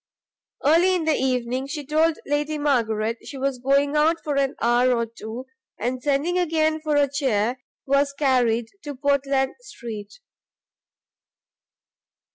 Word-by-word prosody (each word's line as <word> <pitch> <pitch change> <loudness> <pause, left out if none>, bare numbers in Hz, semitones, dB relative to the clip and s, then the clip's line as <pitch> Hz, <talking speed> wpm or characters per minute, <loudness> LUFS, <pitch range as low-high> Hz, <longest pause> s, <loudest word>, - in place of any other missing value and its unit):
Early 340 +5 +4
in 340 -3 -1
the 315 - +3
evening, 255 -1 -1
she 295 0 -5
told 315 +2 +2
Lady 295 +1 -1
Margaret 230 -6 0
she 280 - -8
was 270 -1 -2
going 280 +3 +2
out 310 +3 +4
for 295 -2 -2
an 275 -1 +1
hour 245 +2 +3
or 235 - 0
two, 230 +2 -8 0.3
and 250 +3 -2
sending 295 +6 +1
again 315 -2 +1
for 305 -1 0
a 290 -1 +4
chair, 255 -4 0 0.2
was 280 +1 +2
carried 245 -5 +1
to 290 -2 -6
Portland 275 -1 +1
street. 225 - -9
275 Hz, 135 wpm, -23 LUFS, 245-300 Hz, 0.3 s, Early